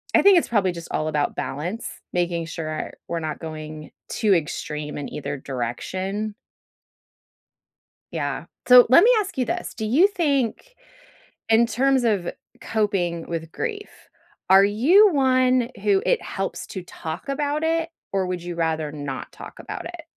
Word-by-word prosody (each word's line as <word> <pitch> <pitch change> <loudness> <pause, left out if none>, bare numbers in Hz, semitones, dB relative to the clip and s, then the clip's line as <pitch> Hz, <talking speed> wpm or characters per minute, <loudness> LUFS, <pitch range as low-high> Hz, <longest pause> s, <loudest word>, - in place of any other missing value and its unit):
I - - +7
think 395 -2 +8
it's - - -5
probably 195 -6 +2
just 170 -1 -9
all 155 - -1
about 150 -1 0
balance, 175 - -4 0.2
making 175 -1 0
sure 155 -1 -5 0.2
we're 170 - -1
not 155 -1 -4
going 155 -1 -8 0.2
too 215 -4 +2
extreme 150 -1 -3
in 145 - -4
either 140 -1 -4
direction. 185 - -4 1.8
Yeah. - - -3 0.2
So 250 -1 +9
let 300 - +7
me - - +6
ask 380 -7 -6
you 255 - +2
this. - - -4
Do 220 - -4
you 300 - +5
think- 325 - -1 0.7
in 225 +1 +5
terms 265 +1 +2
of 200 -6 +1 0.3
coping 185 -6 -1
with 165 -1 -4
grief- 420 -3 -4 0.6
are 190 +1 +8
you 325 - +5
one 255 -3 +3
who 200 -2 +3
it - - +2
helps - - -4
to 190 - -6
talk 160 - -7
about 290 +2 -1
it, 330 0 +1 0.2
or 195 -1 0
would 180 -1 -3
you 175 0 -5
rather 160 -2 -1
not 145 -3 -6
talk - - -11
about - - -7
it? 345 -1 -8
200 Hz, 155 wpm, -23 LUFS, 160-265 Hz, 1.8 s, So